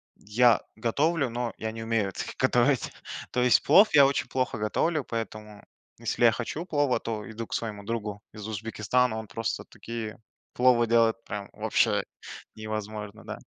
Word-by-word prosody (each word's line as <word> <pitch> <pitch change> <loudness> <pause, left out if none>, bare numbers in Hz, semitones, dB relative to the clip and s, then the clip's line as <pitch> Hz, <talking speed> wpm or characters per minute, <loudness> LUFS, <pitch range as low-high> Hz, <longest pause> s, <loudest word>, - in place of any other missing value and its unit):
я 115 +2 +3
готовлю, 140 +6 +1
но 120 0 -3
я 110 0 -3
не 115 0 -6
умею 115 -3 0
это 95 - -5
г - - -6
готовить. 130 0 +2 0.4
То 125 - +1
есть 125 -3 +5
плов 205 +3 +7
я 140 -2 +8
очень 135 -2 0
плохо 130 0 -1
готовлю, 145 +9 0
поэтому 110 -3 -6 0.3
если 115 +1 -2
я 115 - +7
хочу 125 +9 -4
плова, 145 -8 +1
то 110 -2 -5
иду 110 0 -6
к - - -8
своему 105 -3 -3
другу 105 -2 -4
из 105 0 -7
Узбекистана. 110 +2 0
Он 110 -1 -6
просто 115 +2 -3
такие 115 -2 -7 0.4
пловы 125 -2 +4
делает, 115 0 +3
прям 100 -1 -5
вообще - - +2 0.5
невозможно, 110 0 -6
да. - - -6
115 Hz, 165 wpm, -27 LUFS, 110-125 Hz, 0.5 s, я